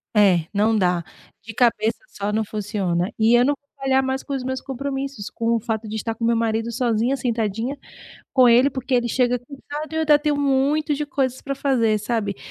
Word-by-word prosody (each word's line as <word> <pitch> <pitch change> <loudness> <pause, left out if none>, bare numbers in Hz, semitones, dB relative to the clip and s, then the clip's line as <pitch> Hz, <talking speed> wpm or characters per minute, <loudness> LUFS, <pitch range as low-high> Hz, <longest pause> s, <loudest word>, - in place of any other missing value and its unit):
É 190 -6 +4
não 215 +2 +2
dá, 180 -3 +1 0.4
de 225 +5 -9
cabeça 230 -2 +2
só 200 +1 -3
não 220 +1 0
funciona, 195 -4 -2
e 225 +1 +4
eu 240 - +5
não 285 +3 +2
vou 285 - -51
falhar 270 -1 +1
mais 265 0 -1
com 280 - -6
os 260 - -3
meus 260 0 -3
compromissos, 270 -4 -4
com 230 0 0
o - - +1
fato 220 -1 -3
de 215 - -5
estar 225 +1 -2
com 225 - -8
o - - +3
meu 235 - +3
marido 225 0 -1
sozinha, 240 +2 0
sentadinha 230 +1 -2 0.6
com 255 -2 +6
ele, 245 +3 +6
porque 260 -1 -3
ele 240 -1 +2
chega 250 0 +1
cansado, 290 +5 -8
e - - -5
eu 320 - 0
ainda 300 -2 +5
tenho 295 -1 0
muito 285 +2 +1
de 295 +1 -3
coisas 260 -2 -1
pra 275 - -4
fazer, 245 -6 +1
sabe. 210 -3 -2
240 Hz, 215 wpm, -22 LUFS, 220-270 Hz, 0.6 s, com